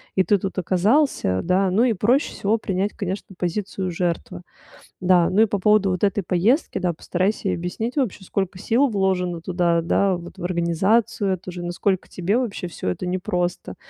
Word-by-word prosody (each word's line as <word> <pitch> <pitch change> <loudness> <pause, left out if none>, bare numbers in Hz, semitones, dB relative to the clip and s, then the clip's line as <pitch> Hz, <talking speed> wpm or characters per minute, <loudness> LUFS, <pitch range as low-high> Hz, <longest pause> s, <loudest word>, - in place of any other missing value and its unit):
и 190 - +4
ты 205 0 +2
тут 195 +1 -5
оказался, 185 - +2
да. 185 +2 +2
Ну 210 +6 +3
и 240 -3 +3
проще 235 +9 +2
всего 215 +3 0
принять, 195 -1 -2
конечно, 195 -1 -5
позицию 185 +1 -3
жертвы. 175 +1 -3 0.6
Да, 180 -2 +4
ну 200 +4 +3
и 225 - +7
по 205 -2 -2
поводу 210 -1 +3
вот 180 +1 -3
этой 200 -1 +1
поездки, 200 - +1
да, 180 - 0
постарайся 185 +4 -1
ей - - 0
объяснить 200 - -4
вообще, 215 -7 -1
сколько 190 -1 -3
сил 240 +8 +2
вложено 185 -4 0
туда, 170 -1 +1
да, 190 +2 +2
вот 175 0 -11
в - - -7
организацию 190 +4 +1
эту 185 0 -6
же, 175 0 -7
насколько 175 +2 -1
тебе 195 +6 0
вообще 220 -7 -3
всё 155 - -4
это 90 - -3
непросто. 180 -1 -2
185 Hz, 180 wpm, -22 LUFS, 175-205 Hz, 0.6 s, и